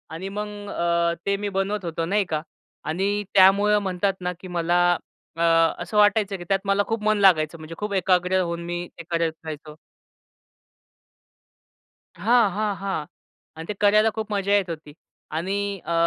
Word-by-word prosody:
आणि 190 +4 -5
मग 210 +1 -4 0.2
अ, 170 0 +1
ते 200 0 +1
मी 205 0 -3
बनवत 195 0 -2
होतो 165 0 -2
नाही 200 +2 +1
का? 155 -1 -1 0.4
आणि 195 +6 -1
त्यामुळं 200 +2 +5
म्हणतात 190 0 0
ना, 180 0 -2
की 185 - -10
मला 175 0 +1 0.6
अ, - - +2 0.4
असं 210 - -3
वाटायचं 205 -1 +3
की 175 - -8
त्यात 195 -1 +3
मला 200 +1 +2
खूप 225 -1 -2
मन 215 0 +2
लागायचं 165 -4 +4
म्हणजे 155 +1 -9
खूप 210 -1 -3
एकाग्र 185 0 +2
होऊन 170 -1 -3
मी 175 0 -4
ते 170 - -8
करत 165 -1 +1
राहायचो. 155 0 -8 2.4
हां, 235 -3 +3
हां, 205 0 -1
हां. 190 -6 -2 0.5
आणि 165 - -7
ते 210 - -2
करायला 210 +2 +5
खूप 220 -1 -4
मजा 200 0 -1
येत 190 -3 +1
होती 155 -2 -7 0.4
आणि 190 +4 -2 0.3
अ, 170 - -2
190 Hz, 165 wpm, -24 LUFS, 170-205 Hz, 2.4 s, त्यामुळं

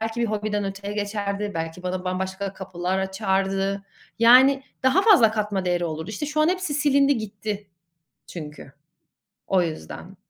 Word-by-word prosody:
belki 225 +1 -3
bir 235 - +2
hobiden 210 -1 -2
öteye 195 +1 -5
geçerdi. 205 0 -2
Belki 165 +2 -4
bana 180 0 -3
bambaşka 190 +1 -3
kapılar 185 -1 -3
açardı. 195 0 -1 0.4
Yani 260 +4 +6 0.2
daha 260 +10 +4
fazla 275 - +6
katma 210 -3 -2
değeri 175 -1 0
olurdu. 160 +3 -4
İşte, 220 +8 -4
şu 300 +1 -1
an 310 - +4
hepsi 365 -5 -1
silindi 280 -1 +3
gitti 205 -1 -5 0.6
çünkü. 150 -4 -9 0.7
O 185 -2 +3
yüzden 170 +3 -6
200 Hz, 145 wpm, -24 LUFS, 190-225 Hz, 0.7 s, Yani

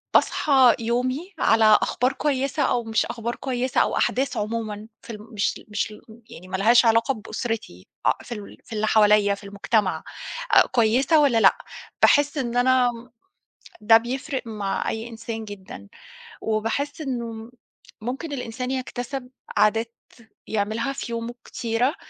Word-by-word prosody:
باصحى 265 -5 +5
يومي 255 - -2
على 220 -1 +5
أخبار 255 +2 0
كويسة 275 +1 0
أو 245 -2 +1
مش 225 -1 0
أخبار 235 0 -4
كويسة 255 -1 0
أو - - 0
أحداث 255 -1 0
عمومًا 215 0 -3 0.2
في - - -15
الم 210 +1 -10
مش 205 -1 0
ل - - -17
مش 210 +1 -2
لم 220 +2 -16
يعني 180 - -12
ما 190 - -2
لهاش 235 +5 +5
علاقة 230 +4 +3
بأسرتي 220 - -5 0.2
آآ، - - +5
في - - -14
ال 205 -2 -10
في 235 - -10
اللي 215 0 0
حواليّا 210 -2 +4
في 200 - -15
المجتمع 200 0 0 0.5
آآ، - - +9
كويسة 250 +7 +3
والّا 265 -6 +3
لأ، 195 - +6 0.4
باحس 290 +1 +4
إن 240 -2 -2
أنا 250 0 +4
م 235 0 -12 0.7
ده 225 +1 +8
بيفرق 260 +4 -3
مع 205 -3 -2
أي 220 +1 -4
إنسان 225 -1 -6
جدًا 205 -1 -10 0.6
وباحس 225 +8 -2
إنه 235 -4 -5 0.5
ممكن 270 +7 -4
الإنسان 250 -1 -4
يكتسب 255 0 -4 0.3
عادات 225 +2 +2 0.5
يعملها 220 +5 -1
في 235 - -6
يومه 230 +1 -4
كتيرة، 240 +4 -1
230 Hz, 150 wpm, -24 LUFS, 215-255 Hz, 0.7 s, آآ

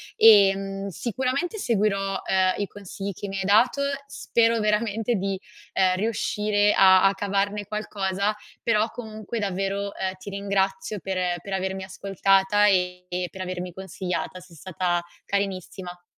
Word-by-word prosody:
e, 200 -3 +7
mhmm, 195 0 -5
sicuramente 260 - -2
seguirò, 195 - 0
ehm, 185 -1 +3
i 200 - -1
consigli 200 0 -6
che 200 - -7
mi 195 0 -4
hai 190 - -1
dato, 220 +8 +4 0.3
spero 230 -3 +1
veramente 215 +2 +1
di, 195 -1 -2 0.3
ehm, 185 -1 +3
riuscire 210 0 +1
a 190 -1 +6
a 195 - +5
cavarne 200 +1 -1
qualcosa, 200 -1 -1 0.3
però, 220 -1 +2
comunque, 220 -1 -7
davvero, 195 0 -2
ehm, 190 0 -2
ti 200 - -9
ringrazio 195 0 -1
per 190 -1 -3 0.2
per 200 - -9
avermi 190 0 -2
ascoltata 195 +1 +2
e 180 -2 +1
e 180 0 -2
per 190 - -9
avermi 180 -1 -4
consigliata, 185 -1 -4
sei 175 -2 -16
stata 175 +1 -1 0.2
carinissima. 185 -2 -4
195 Hz, 140 wpm, -25 LUFS, 190-210 Hz, 0.3 s, e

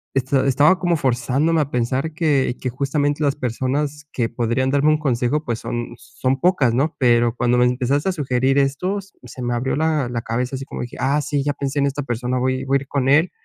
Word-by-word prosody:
esta 135 +1 +1
estaba 145 +7 +4
como 175 -2 +1
forzándome 135 +5 +1
a 145 - -3
pensar 130 +6 -1
que 145 -6 +1
que 130 - -1
justamente 145 +3 -1
las 140 -1 +1
personas 140 +4 -2
que 120 -3 0
podrían 120 +3 0
darme 145 +2 +3
un 155 0 +3
consejo, 135 +2 0
pues, 115 -2 -2
son 120 0 -5
son 130 +1 -2
pocas, 150 -10 +3
¿no? 145 +6 0
Pero 120 -2 +3
cuando 125 0 +2
me 125 - +4
empezaste 130 +7 0
a - - 0
sugerir 135 -3 0
esto, 180 +9 0
se 130 -10 -13
me 120 0 -1
abrió 125 +3 -1
la 155 -5 +1
la 120 -1 -3
cabeza, 125 +3 -2
así 135 - -7
como - - -6
dije: 120 - -7
"ah, 140 +3 +1
sí, 145 -1 -1
ya 145 - +1
pensé 140 0 -3
en 140 - +3
esta 140 +1 -3
persona". 125 0 -2
Voy 130 +1 -1
voy 135 +1 +2
a - - -5
ir 135 - -10
con 135 -2 0
él, 160 +5 +4
135 Hz, 225 wpm, -21 LUFS, 125-145 Hz, -, estaba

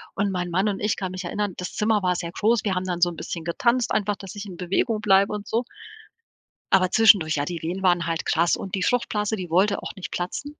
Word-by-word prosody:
Und 200 0 0
mein 180 -1 -2
Mann 190 +4 +1
und 195 - -3
ich 210 0 +1
kann 185 -2 -4
mich 185 +1 -5
erinnern, 205 +1 -2
das 180 - -5
Zimmer 210 -2 +1
war 180 -1 +2
sehr 170 -1 -4
groß, 220 +3 +1
wir 190 - 0
haben 180 0 -2
dann 175 -2 -3
so 175 - +5
'n 170 - -8
bisschen 165 0 -5
getanzt 235 +8 +1
einfach, 205 0 0
dass 195 -1 -10
ich 205 0 -6
in 180 -3 -9
Bewegung 195 +5 0
bleibe 200 0 +4
und 210 0 -5
so 230 +2 0 1.1
aber 185 -1 +4
zwischendurch 195 -8 +5
ja, 145 -1 -1
die 170 0 -5
Wehen 180 +4 -3
waren 175 -2 +2
halt 165 -1 -2
krass 170 +1 +2
und 190 - -5
die 185 - -2
Fruchtblase, 220 -3 0
die 185 -5 -6
wollte 195 +4 +2
auch - - -7
nicht 190 - -7
platzen. 280 +12 -4
190 Hz, 250 wpm, -24 LUFS, 175-210 Hz, 1.1 s, so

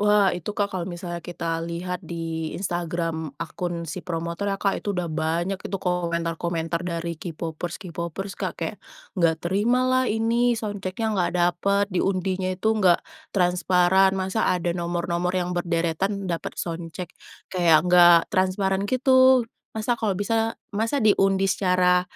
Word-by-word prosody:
Wah, 205 -2 +4
itu 175 +3 -4
Kak, 205 -1 0
kalau 180 -2 -3
misalnya 175 -1 -5
kita 165 -1 -3
lihat 170 +2 -4
di 165 -2 -4
Instagram 165 -4 -3
akun 170 +1 -4
si 165 +3 -5
promotornya 170 +3 -3
Kak, 195 0 0
itu 200 -3 -3
udah 175 -2 -1
banyak 170 +4 -1
itu 195 - -4
komentar-komentar 170 -2 -1
dari 170 -1 -4
K-popers 165 0 -5
K-popers 175 +2 -5
Kak, - - -3
kayak - - -4 0.4
enggak 165 -4 +2
terima 225 +8 +2
lah 255 0 +3
ini 230 +2 +2
sound 205 -3 -4
check-nya 215 +4 -2
enggak 180 -4 0
dapet, 185 +3 +2
diundinya 185 0 0
itu 190 +4 +1
enggak 190 -5 +3 0.2
transparan, 180 +1 +3
masa 190 +4 0
ada 175 -1 +1
nomor-nomor 175 +1 -1
yang 180 0 -1
berderetan 175 +3 -1
dapet 170 -2 -4
sound 165 -1 -4
check. 180 -1 -6 0.4
Kayak 170 -3 +4
enggak 175 -1 +7 0.2
transparan 190 0 +1
gitu. 260 -1 +5 0.3
Masa 220 +2 -1
kalau 205 -5 -1
bisa 225 +2 0 0.2
masa 225 +7 0
diundi 195 -3 +3
secara 180 -2 +3
180 Hz, 145 wpm, -24 LUFS, 170-200 Hz, 0.4 s, enggak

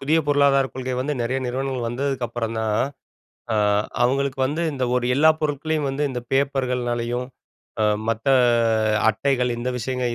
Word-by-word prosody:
புதிய 155 +4 +2
பொருளாதாரக் 140 -2 +3
கொள்கை 130 -1 -3
வந்து, 145 +3 -1
நறைய 130 +3 -1
நிறுவனங்கள் 130 -1 -2
வந்ததுக்கப்றம்தான். 120 -4 -2 0.7
அ - - +1 0.5
அவங்களுக்கு 135 +2 0
வந்து 150 +5 -2
இந்த 130 -2 -2
ஒரு 125 -1 0
எல்லா 155 +3 +6
பொருட்களையும் 150 0 -1
வந்து, 140 +2 -1
இந்த 125 -2 -4
பேப்பர்கள்னாலயும், 125 -3 0 0.6
அ - - +3 0.3
மத்த 115 +3 -2 0.8
அட்டைகள் 125 +2 0
இந்த 120 +1 -3
விஷயங்கள் 125 0 -2
130 Hz, 130 wpm, -23 LUFS, 120-140 Hz, 0.8 s, எல்லா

